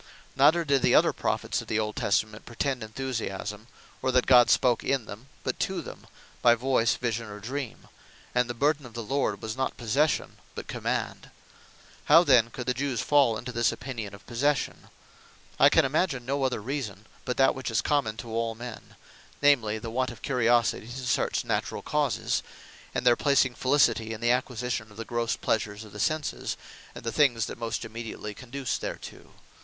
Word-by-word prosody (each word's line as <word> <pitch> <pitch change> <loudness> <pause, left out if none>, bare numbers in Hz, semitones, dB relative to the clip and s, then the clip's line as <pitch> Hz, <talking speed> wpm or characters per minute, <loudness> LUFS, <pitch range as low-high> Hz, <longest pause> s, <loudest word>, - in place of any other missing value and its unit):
Neither 155 +5 +5
did 140 -2 +2
the - - +4
other - - +5
Prophets - - -1
of - - -12
the 110 - 0
old 105 -1 -1
Testament 105 +1 -1
pretend 125 +2 -2
Enthusiasme; 110 -3 -4 0.3
or, 130 - +1
that 125 -1 +3
God 125 -2 +7
spake 120 -2 +3
in 135 -4 0
them; 110 +6 -10 0.2
but - - -2
to - - -1
them - - -11 0.3
by 120 -1 +6
Voyce, 120 -2 +2
Vision, 115 -2 -2
or 105 0 -8
Dream; 125 +3 -6 0.5
and 125 -1 +2
the 120 - -3
Burthen 145 +1 +1
Of 115 - -15
The 115 - -4
Lord 115 -4 -1
was 110 0 -3
not 130 0 -2
Possession, 135 +6 0 0.2
but - - -6
Command. - - -3 0.8
How 165 - +7
then 125 -7 +5
could 125 +1 -6
the 125 - +1
Jewes 130 -2 -1
fall 140 -6 +3
into 120 +3 -6
this 115 -1 +2
opinion 115 -6 -6
of 100 - -17
possession? 140 +4 -1 0.7
I - - +8
can - - +4
imagine 135 -3 0
no 135 +2 -1
reason, 115 -4 -4 0.2
but 125 - -3
that 135 - +5
which 130 -2 -4
is 115 - +1
common 140 -8 0
to 120 - -7
all 115 0 -1
men; 120 0 -9 0.4
namely, 120 -7 +3
the 115 +1 -6
want 130 +2 0
of 120 - -11
curiosity 120 -4 +2
to 125 +2 -6
search 125 - 0
naturall - - -2
causes; - - 0 0.5
and - - -1
their 120 -1 +6
placing 140 -2 +3
Felicity, 120 -4 +2
in 110 - -7
the 120 +1 +2
acquisition 125 -3 -2
of 105 - -16
the 115 - -5
grosse 120 0 -1
pleasures 105 -1 -1
of 105 - -13
the 105 - -9
Senses, 155 +6 -1 0.4
and - - -9
the 115 - -2
things 120 -4 +3
that - - -8
most 115 -1 -3
immediately 110 -2 -6
conduce 130 +2 -4
thereto. - - -7
120 Hz, 185 wpm, -27 LUFS, 110-135 Hz, 0.8 s, I